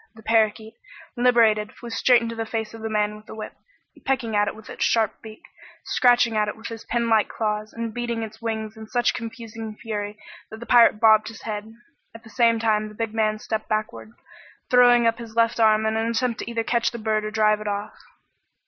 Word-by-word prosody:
The 220 Hz, -, -15 dB
parakeet, 220 Hz, 0 st, +1 dB, 0.4 s
liberated, 230 Hz, -4 st, +3 dB
flew 235 Hz, -, -10 dB
straight 240 Hz, +1 st, +4 dB
into 230 Hz, 0 st, -4 dB
the 225 Hz, 0 st, -3 dB
face 220 Hz, -1 st, -4 dB
of 225 Hz, -, -10 dB
the 220 Hz, -, -4 dB
man 210 Hz, -1 st, 0 dB
with 215 Hz, -, -17 dB
the -, -, -9 dB
whip, 220 Hz, -, -7 dB, 0.5 s
pecking 245 Hz, -5 st, -1 dB
at 205 Hz, 0 st, +2 dB
it -, -, -3 dB
with 220 Hz, 0 st, -14 dB
its -, -, -4 dB
sharp 225 Hz, -3 st, +1 dB
beak, 220 Hz, -1 st, -12 dB, 0.4 s
scratching 245 Hz, -2 st, +3 dB
at 210 Hz, -1 st, +1 dB
it 210 Hz, -, -5 dB
with 220 Hz, -, -8 dB
his 230 Hz, -1 st, -8 dB
pin 235 Hz, 0 st, -1 dB
like 220 Hz, -2 st, +3 dB
claws, 215 Hz, -1 st, -3 dB
and 230 Hz, -1 st, -5 dB
beating 235 Hz, -1 st, -3 dB
its 220 Hz, +1 st, -9 dB
wings 220 Hz, -1 st, -4 dB
in 220 Hz, 0 st, -10 dB
such 240 Hz, +1 st, +1 dB
confusing 225 Hz, -2 st, -7 dB
fury 210 Hz, -2 st, -5 dB, 0.3 s
that 220 Hz, -, -10 dB
the 235 Hz, -, -8 dB
pirate 235 Hz, -3 st, +5 dB
bobbed 215 Hz, -1 st, +5 dB
his 225 Hz, -1 st, -10 dB
head. 215 Hz, 0 st, -5 dB, 0.4 s
At 225 Hz, -, -12 dB
the 225 Hz, -, -15 dB
same 230 Hz, 0 st, +3 dB
time 215 Hz, -1 st, +1 dB
the 210 Hz, -, -12 dB
big 225 Hz, 0 st, -3 dB
man 215 Hz, -1 st, +1 dB
stepped 215 Hz, 0 st, -4 dB
backward, 215 Hz, +1 st, -3 dB, 0.6 s
throwing 245 Hz, -1 st, +6 dB
up 230 Hz, 0 st, +1 dB
his 230 Hz, -1 st, -10 dB
left 230 Hz, 0 st, +2 dB
arm 220 Hz, -1 st, +4 dB
in 220 Hz, 0 st, 0 dB
an 225 Hz, +1 st, 0 dB
attempt 235 Hz, 0 st, -1 dB
either 230 Hz, -1 st, -2 dB
to -, -, -24 dB
catch 235 Hz, -1 st, +2 dB
the 235 Hz, -, -8 dB
bird 215 Hz, -1 st, -1 dB
or 215 Hz, -, -3 dB
drive 215 Hz, -1 st, +2 dB
it 210 Hz, -, -6 dB
off. 205 Hz, +1 st, -3 dB
220 Hz, 220 wpm, -23 LUFS, 215-230 Hz, 0.6 s, throwing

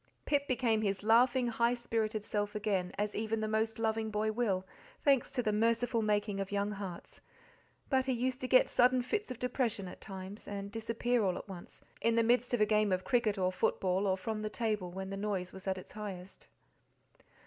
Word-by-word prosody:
Pip 285 Hz, -1 st, +1 dB
became 235 Hz, -4 st, +2 dB
his 200 Hz, -2 st, -1 dB
laughing, 245 Hz, +3 st, +4 dB
high 235 Hz, +1 st, +2 dB
spirited 220 Hz, -3 st, -2 dB
self 205 Hz, -1 st, -2 dB
again, 195 Hz, -4 st, 0 dB
as 210 Hz, +1 st, -1 dB
even 220 Hz, +1 st, -1 dB
the 215 Hz, -, -1 dB
most 220 Hz, +1 st, 0 dB
loving 220 Hz, -1 st, 0 dB
boy 215 Hz, +1 st, 0 dB
will, 205 Hz, -5 st, 0 dB, 0.4 s
thanks 275 Hz, -3 st, +3 dB
to 250 Hz, -2 st, 0 dB
the 215 Hz, -, +1 dB
merciful 230 Hz, +2 st, +2 dB
making 205 Hz, -1 st, 0 dB
of 195 Hz, 0 st, -3 dB
young 205 Hz, +1 st, 0 dB
hearts; 195 Hz, -4 st, -7 dB, 0.7 s
but 265 Hz, -1 st, +1 dB
he -, -, +2 dB
used 255 Hz, +1 st, -1 dB
to 255 Hz, -, -2 dB
get 255 Hz, 0 st, +6 dB
sudden 250 Hz, 0 st, +4 dB
fits 415 Hz, -, -2 dB
of 255 Hz, -, -5 dB
depression 240 Hz, -5 st, -1 dB
at 180 Hz, -, -10 dB
times, 195 Hz, +1 st, -8 dB
and 200 Hz, 0 st, -5 dB
disappear 230 Hz, +2 st, 0 dB
all 185 Hz, -2 st, +1 dB
at -, -, -8 dB
once, 185 Hz, -3 st, -10 dB, 0.2 s
in 230 Hz, 0 st, +2 dB
the 230 Hz, -, +4 dB
midst 245 Hz, +1 st, +2 dB
of 245 Hz, -3 st, +1 dB
a -, -, +7 dB
game 210 Hz, -1 st, +2 dB
of 185 Hz, 0 st, +1 dB
cricket 235 Hz, -5 st, +1 dB
or 185 Hz, -1 st, +1 dB
football, 185 Hz, +1 st, +1 dB
or 190 Hz, -1 st, +2 dB
from 215 Hz, +3 st, -3 dB
the 215 Hz, -, -2 dB
table 215 Hz, -5 st, -1 dB
when 190 Hz, +2 st, -6 dB
the -, -, -3 dB
noise 195 Hz, -3 st, -2 dB
was 190 Hz, 0 st, -9 dB
at 190 Hz, 0 st, 0 dB
its 185 Hz, -, -10 dB
highest. 195 Hz, -3 st, -8 dB
215 Hz, 205 wpm, -33 LUFS, 195-235 Hz, 0.7 s, a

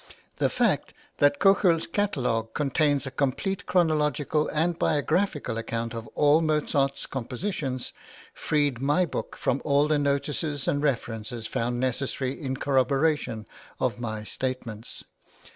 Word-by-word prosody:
The -, -, +2 dB
fact -, -, +1 dB, 0.2 s
that 145 Hz, 0 st, +4 dB
Köchel's 195 Hz, -4 st, +4 dB
catalogue 125 Hz, -, -1 dB
contains 145 Hz, -1 st, +1 dB
a 135 Hz, -, -5 dB
complete 145 Hz, +9 st, -1 dB
chronological 155 Hz, -3 st, +2 dB
and 165 Hz, +2 st, 0 dB
biographical 150 Hz, -, 0 dB
account 115 Hz, 0 st, -3 dB
of 115 Hz, -1 st, -6 dB
all 150 Hz, +2 st, +5 dB
Mozart's 150 Hz, -3 st, +1 dB
compositions 130 Hz, -, -4 dB, 0.4 s
freed 145 Hz, -5 st, 0 dB
my 145 Hz, +6 st, +3 dB
book 160 Hz, -, -5 dB
from 135 Hz, +1 st, 0 dB
all 145 Hz, 0 st, +3 dB
the 150 Hz, -1 st, +2 dB
notices 145 Hz, +1 st, -1 dB
and 145 Hz, -, +1 dB
references 115 Hz, -4 st, -2 dB
found 120 Hz, +1 st, -1 dB
necessary 130 Hz, +1 st, -1 dB
{INTRODUCTION.} -, -, -5 dB
(xxvii) 155 Hz, -, -9 dB
in 130 Hz, -, -2 dB
corroboration 135 Hz, -3 st, +1 dB, 0.3 s
of 120 Hz, -4 st, 0 dB
my 110 Hz, -3 st, -4 dB
statements. 120 Hz, -2 st, -5 dB
140 Hz, 130 wpm, -27 LUFS, 125-155 Hz, 0.4 s, all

